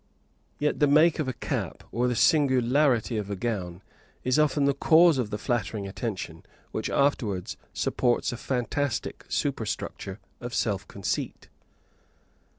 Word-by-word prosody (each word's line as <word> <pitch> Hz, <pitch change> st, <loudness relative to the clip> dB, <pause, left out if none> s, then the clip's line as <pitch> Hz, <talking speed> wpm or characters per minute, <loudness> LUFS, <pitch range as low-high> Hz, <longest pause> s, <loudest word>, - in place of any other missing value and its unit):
Yet 150 Hz, 0 st, 0 dB
the 145 Hz, -, +5 dB
make 155 Hz, +3 st, +5 dB
of 150 Hz, -, 0 dB
a 130 Hz, -, -1 dB
cap -, -, -4 dB
or 120 Hz, +1 st, +1 dB
the 125 Hz, -, 0 dB
singularity 130 Hz, -4 st, +3 dB
of 105 Hz, -2 st, -3 dB
a 100 Hz, -, -2 dB
gown 95 Hz, -4 st, -3 dB, 0.4 s
is 130 Hz, +3 st, +2 dB
often 150 Hz, -1 st, +3 dB
the 140 Hz, -, +3 dB
cause 160 Hz, +1 st, +5 dB
of 115 Hz, -4 st, -1 dB
the 105 Hz, -, -3 dB
flattering 110 Hz, -3 st, -2 dB
attention 95 Hz, -5 st, -5 dB, 0.3 s
which -, -, -2 dB
afterwards 115 Hz, -10 st, 0 dB, 0.2 s
supports 120 Hz, -2 st, +1 dB
a 120 Hz, -, -5 dB
fantastic 125 Hz, +1 st, -2 dB
superstructure 95 Hz, +2 st, -3 dB, 0.2 s
of 120 Hz, +1 st, -5 dB
self 100 Hz, -6 st, -1 dB
conceit. 100 Hz, -, -4 dB
125 Hz, 140 wpm, -27 LUFS, 105-140 Hz, 0.4 s, the